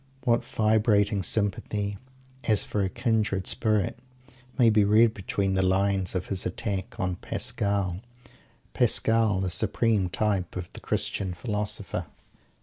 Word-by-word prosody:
What 120 -1 +2
vibrating 105 -2 +1
sympathy 105 +1 -1 0.5
as 110 -3 +3
for 105 - -2
a 95 - 0
kindred 110 -5 -1
spirit 110 0 0 0.6
may 120 -4 +5
be 105 -1 +4
read 110 +2 +4
between 95 -1 -2
the 95 - +1
lines 95 0 +1
of 90 - -2
his 95 -2 -2
attack 95 +1 -4
on 90 -1 -2
Pascal 100 -1 -2 0.7
Pascal, 110 -4 +4
the 95 -2 -2
supreme 105 -1 +1
type 100 -1 -1
of 90 -2 -7
the - - -8
Christian 95 -3 -2
Philosopher! 105 +2 -3
100 Hz, 130 wpm, -26 LUFS, 95-110 Hz, 0.7 s, may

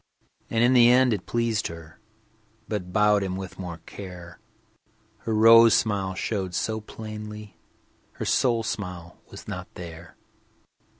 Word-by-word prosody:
And 115 0 +1
in 125 +2 +4
the 120 -1 +7
end 125 -1 +5
it 100 -4 -5
pleased 115 -2 0
her, 80 -1 -11 0.7
But 90 -4 -4
bowed 105 +1 +3
him 95 -1 -2
more 95 - -4
with 85 -3 -8
care. 90 -3 -10 0.8
Her 110 +1 -3
rose 115 0 +7
smile 100 -3 0
showed 95 -3 -3
so 110 0 -2
plainly, 105 -1 -9 0.5
Her - - -5
soul 115 -3 +2
smile 90 -5 -6
was - - -12
not 90 0 -6
there. 85 -1 -10
105 Hz, 135 wpm, -25 LUFS, 90-115 Hz, 0.8 s, the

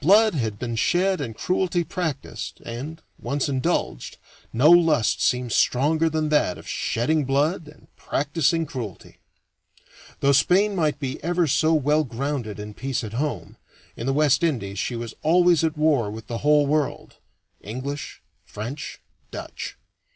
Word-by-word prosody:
Blood 210 +6 +6
had 110 -8 -2
been 120 +1 -4
shed 185 - +2
and 115 -6 -5
cruelty 180 +4 0
practiced, 160 -6 -4
and, 140 +8 -6 0.2
once 140 -1 -1
indulged, 130 - -1 0.3
no 135 +8 +5
lust 165 -9 +4
seems 125 -2 +1
stronger 155 +5 +2
than 155 -1 -1
that 150 -12 +2
of - - -13
shedding 150 +7 0
blood 145 +5 0
and 150 - -16
practicing 165 +3 0
cruelty. 120 - -8 1.0
Though 140 - +3
Spain 195 +9 +3
might 155 -5 +1
be 140 -1 -5
ever 175 +1 +1
so 155 +3 +3
well 150 +1 +2
grounded 125 -4 -4
in 105 0 -7
peace 130 +3 -3
at 110 -1 -6
home, 120 - -3 0.4
in 115 - -5
the - - +2
West 150 +1 +3
Indies 105 - -1
she 120 - -2
was 115 -1 -5
always 175 0 +4
at 160 -1 0
war 150 -8 +2
with 110 +1 -8
the 115 0 -4
whole 150 0 +4
world 150 0 -1 0.4
English, 130 +7 -6 0.2
French, 125 +8 -7 0.3
Dutch. - - -7
145 Hz, 150 wpm, -24 LUFS, 120-160 Hz, 1.0 s, Blood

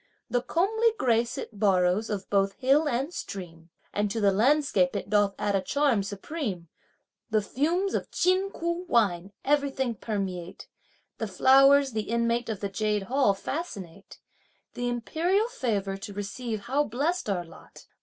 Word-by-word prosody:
The 245 - +2
comely 440 - +1
grace 235 - +1
it 210 - -7
borrows 190 +1 +2
of 200 -3 -3
both 195 -1 +2
hill 275 +7 +2
and 270 +6 -2
stream; 170 - -7 0.2
And 205 0 0
to 225 - -2
the 200 -2 +4
landscape 220 -4 +2
it 200 - -4
doth 205 -1 +3
add 205 -1 0
a 195 - +2
charm 270 +2 +1
supreme. 200 - -5 0.6
The 215 -2 +1
fumes 340 - 0
of - - -2
Chin 370 +2 +2
Ku 340 +1 -3
wine 195 -5 +2
everything 275 -3 +1
permeate; 190 -5 -5 0.5
The 220 - -2
flowers 270 +7 +5
the 215 -2 -3
inmate 235 0 0
of 215 -3 -4
the 200 - -2
Jade 210 0 -1
Hall 245 -2 +2
fascinate. 200 - -6 0.6
The 245 0 -2
imperial 340 - 0
favour 210 - -2
to 200 +1 -8
receive 210 +2 -4
how 275 +7 0
blessed 290 +5 -1
our 180 -3 -1
lot! 165 - -15
225 Hz, 155 wpm, -27 LUFS, 200-280 Hz, 0.6 s, flowers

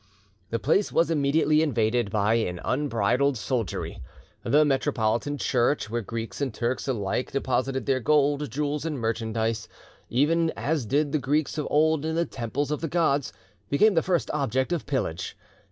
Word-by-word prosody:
The 115 - -1
place 160 - +1
was 165 0 +2
immediately 150 +1 +3
invaded 120 -6 +1
by 105 +1 +1
an 90 -7 0
unbridled 130 0 +1
soldiery. 115 - -3 0.4
The 145 +5 +4
Metropolitan 135 -1 0
church, 120 -3 +1
where 120 0 -1
Greeks 115 +5 -6
and 135 -2 0
Turks 120 +5 -2
alike 115 -1 -1
deposited 135 0 -1
their 135 -2 +1
gold, 145 +1 +2
jewels, 145 +3 -2
and 160 -3 -3
merchandise, 110 -1 -2 0.4
even 160 +6 +2
as 140 0 -1
did 145 +4 +1
the 155 - +1
Greeks 150 +2 0
of 150 - -2
old 155 0 +3
in 160 0 -2
the 170 +1 +1
temples 135 +3 -3
of 150 - -2
the 165 - -1
gods, 150 -4 +1 0.4
became 210 +10 +4
the 165 - +3
first 175 -1 0
object 135 +1 0
of 170 - -3
pillage. 120 - -2
140 Hz, 160 wpm, -26 LUFS, 115-150 Hz, 0.4 s, The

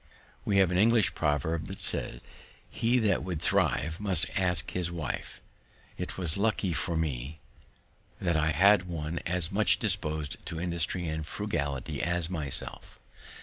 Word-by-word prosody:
We 100 - +1
have 95 -2 +4
an 90 - +1
English 110 -3 +4
proverb 75 +1 -1
that - - -6
says, - - 0 0.5
"He 120 +2 0
that 105 -5 +1
would 90 -4 -4
thrive, 80 +2 +1
must 95 -6 +5
ask 90 -4 0
his 90 -2 -2
wife." 85 -4 -5 0.5
It - - -6
was 85 -3 0
lucky 100 -3 0
for 85 +1 -1
me 75 -1 -3 0.8
that 85 -2 0
I 80 0 +2
had 95 +4 +4
one 85 -1 -4
as 90 -1 +4
much 105 +2 +3
dispos'd 80 - -2
to 80 - -5
industry 85 0 -1
and 80 0 -3
frugality 70 -7 -3
as 90 0 -1
myself. 75 -6 -2
85 Hz, 145 wpm, -29 LUFS, 80-95 Hz, 0.8 s, must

